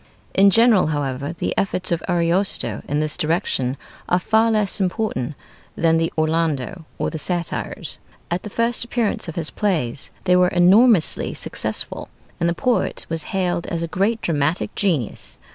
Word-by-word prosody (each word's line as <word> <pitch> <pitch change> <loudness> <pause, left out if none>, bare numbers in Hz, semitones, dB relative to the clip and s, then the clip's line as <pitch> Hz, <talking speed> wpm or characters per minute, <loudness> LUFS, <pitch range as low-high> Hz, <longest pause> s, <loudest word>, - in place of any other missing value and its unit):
In 200 +1 +6
general, 225 -2 +5
however, 145 0 -2
the - - -2
efforts 185 -2 -1
of 170 - 0
Ariosto 170 - 0
in 145 - 0
this 155 0 +1
direction 150 -5 -1 0.3
are 180 - +4
far 220 +5 +2
less 210 -2 +3
important 180 - -1 0.4
than 165 0 +3
the 165 0 0
'Orlando' 160 0 -1
or - - -2
the 160 - -5
'Satires.' 175 0 -3 0.3
At 175 +1 0
the 210 - -7
first 230 +3 0
appearance 235 -5 -1
of 165 - -6
his 165 -3 -2
plays 155 - -1
they 180 -1 +3
were 180 0 +5
enormously 185 +2 +4
successful, - - -3 0.3
and 170 - +2
the 170 - -1
poet 250 +2 0
was 165 -1 0
hailed 180 -3 -1
as 170 -1 -2
a - - -2
great 200 +7 0
dramatic 155 +1 0
genius. 165 - -1
175 Hz, 160 wpm, -21 LUFS, 155-195 Hz, 0.4 s, In